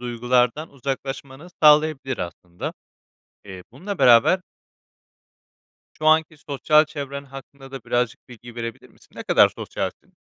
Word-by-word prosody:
duygulardan 125 +4 0
uzaklaşmanı 135 +2 -6 0.2
sağlayabilir 150 -4 +4
aslında. 90 0 -6 0.7
Eee, 95 -2 -10
bununla 185 - -6
beraber 120 +10 +5 1.6
şu 155 - -3
anki 160 0 +3
sosyal 150 +1 +2
çevren 140 -2 -7
hakkında 135 0 -12
da 135 0 -7
birazcık 120 0 -2
bilgi 120 -1 -13
verebilir 115 -1 -7
misin? - - -25
Ne - - -7
kadar - - +5
sosyalsin? - - -6
135 Hz, 115 wpm, -22 LUFS, 120-150 Hz, 1.6 s, beraber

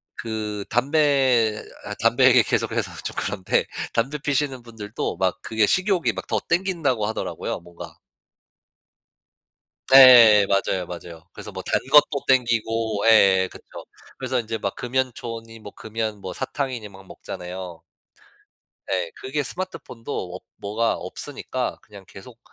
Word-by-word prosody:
그 105 -2 -4
담배 130 -4 +2 0.2
아 105 - -5
담배 115 +3 +4
얘기 125 -2 +6
계속해서 - - -1
좀 - - -5
그런데 95 -3 0 0.3
담배 135 +6 0
피우시는 140 -2 -1
분들도 110 -5 -5
막 95 0 -1
그게 110 -1 +1
식욕이 185 - +1
막 95 - -7
더 110 - 0
당긴다고 165 - 0
하더라고요, 110 - -4
뭔가. 85 -1 -12 2.0
예 120 -6 +9
맞아요, 95 -2 0
맞아요. 85 -1 -10
그래서 - - -10
뭐 - - -6
단것도 145 +1 +3
당기고 115 -4 +1
예 95 -4 +5
그쵸. - - -13 0.5
그래서 - - -1
인제 115 -1 -3
막 100 -2 -4
금연초니 120 -3 -4
뭐 105 -2 -10
금연 110 -2 -4
뭐 95 - -6
사탕이니 130 -5 -4
막 95 -1 -15
먹잖아요. 90 -1 -8 1.0
네. 90 -3 -2
그게 140 +3 -2
스마트폰도 125 - -6
없 95 - -10
뭐가 110 +3 -1
없으니까 - - -5
그냥 100 -2 -14
계속 115 +5 -13
115 Hz, 280 characters per minute, -23 LUFS, 100-130 Hz, 2.0 s, 예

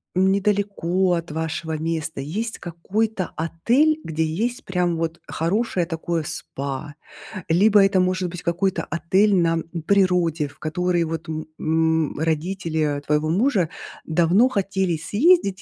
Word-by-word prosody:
недалеко 190 -1 +1
от 170 -2 -3
вашего 160 0 -3
места 160 -1 -3
есть 215 +11 -4
какой-то 190 +4 -2
отель, 240 - +2
где 160 0 -1
есть 220 +11 -2
прям 180 -2 0
вот 165 +1 -3
хорошее 180 +1 0
такое 165 0 -2
СПА. 140 0 -6 0.5
Либо 200 +5 +5
это 195 -1 +2
может 185 0 +1
быть 180 0 -7
какой-то 180 +2 0
отель 190 +4 +2
на, 170 -2 +3
м, - - -5 0.2
природе, 180 -6 +2
в 145 - -17
который, 175 +2 0
вот, 165 +1 -5
м, 155 0 -4
м, 160 -1 +1
родители 160 -2 -1
твоего 150 +1 +1
мужа 195 - +2 0.4
давно 175 +9 +3
хотели 190 -6 0
съездить 205 - +2
170 Hz, 130 wpm, -23 LUFS, 160-195 Hz, 0.5 s, Либо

